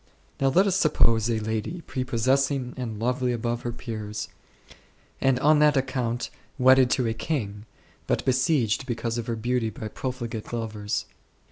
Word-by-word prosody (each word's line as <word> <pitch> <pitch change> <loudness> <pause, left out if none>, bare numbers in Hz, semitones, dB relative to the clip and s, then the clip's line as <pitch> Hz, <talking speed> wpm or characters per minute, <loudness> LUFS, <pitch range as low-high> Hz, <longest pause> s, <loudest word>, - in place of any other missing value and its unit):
Now 135 - +2
let 180 +9 +4
us 195 -2 +2
suppose 115 - +3
a 115 -1 +1
lady, 110 +10 -3
prepossessing 130 0 0
and 120 -4 -4
lovely 125 +2 0
above 120 0 -2
her 120 - -3
peers, 110 -3 -5 0.9
and 135 -2 +3
on 150 +1 +5
that 150 -1 +5
account 125 -3 -1 0.3
wedded 130 -1 +6
to 125 - +1
a 115 - 0
king, 110 -5 -3 0.4
but - - 0
besieged 130 - +2
because 120 -1 -2
of 115 - -5
her 115 - -1
beauty 120 0 0
by 110 0 -7
profligate 120 -3 -5
lovers. 105 -3 -3
120 Hz, 150 wpm, -26 LUFS, 115-130 Hz, 0.9 s, wedded